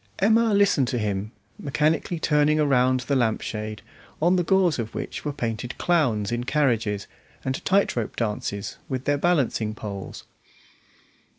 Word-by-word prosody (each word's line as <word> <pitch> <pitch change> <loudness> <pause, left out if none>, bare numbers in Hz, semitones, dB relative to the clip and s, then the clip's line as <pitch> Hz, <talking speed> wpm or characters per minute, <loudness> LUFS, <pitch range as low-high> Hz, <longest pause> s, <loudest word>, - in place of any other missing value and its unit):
Emma 225 +3 +3
listened 200 -10 +3
to 125 - -1
him, 105 -1 -2 0.3
mechanically 155 +4 0
turning 150 -1 +3
around 130 -3 +3
the 140 +2 -1
lampshade, 110 -3 -2 0.4
on 175 +4 +3
the 180 - +3
gauze 180 -4 +2
of 115 -1 -4
which - - -5
were 150 - -2
painted 120 -2 -4
clowns 125 - +1
in 120 0 -1
carriages, 115 -8 0 0.4
and 130 0 -2
tight 195 +1 +2
rope 115 -3 -3
dances 105 -3 -3
with 130 -1 -3
their 145 0 +1
balancing 135 -10 +1
poles. 100 -4 -7
130 Hz, 140 wpm, -25 LUFS, 110-155 Hz, 0.4 s, Emma